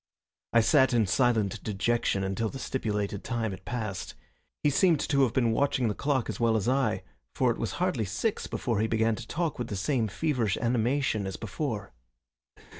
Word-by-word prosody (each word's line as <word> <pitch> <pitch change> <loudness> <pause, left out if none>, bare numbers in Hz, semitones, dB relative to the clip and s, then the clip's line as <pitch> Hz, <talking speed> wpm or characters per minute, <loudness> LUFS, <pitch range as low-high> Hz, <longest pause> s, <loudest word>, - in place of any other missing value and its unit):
I 115 - +5
sat 130 +2 +4
in 115 -2 +4
silent 110 -2 +1
dejection 105 -1 0
until 95 +4 -1
the 135 - -7
stipulated 105 -6 -2
time 115 -3 -2
had 95 - -9
passed. 110 -6 -4 0.5
He 145 - +4
seemed 165 +1 +4
to 140 -1 +2
have 130 -4 +3
been 120 -3 +2
watching 125 -1 +1
the - - 0
clock 135 0 0
as - - -4
well 115 -1 +3
as 105 +1 -2
I, 135 +1 +1 0.3
for - - +3
it - - -4
was - - -2
hardly 110 - 0
six 115 - -2
before 115 -5 -1
he 110 - +2
began 110 0 +2
to 115 +1 -7
talk 165 -3 -2
with 120 - -2
the 105 - -4
same 115 +4 0
feverish 120 - 0
animation 120 -2 0
as 95 - -5
before. 110 - -4
115 Hz, 190 wpm, -28 LUFS, 105-130 Hz, 0.5 s, I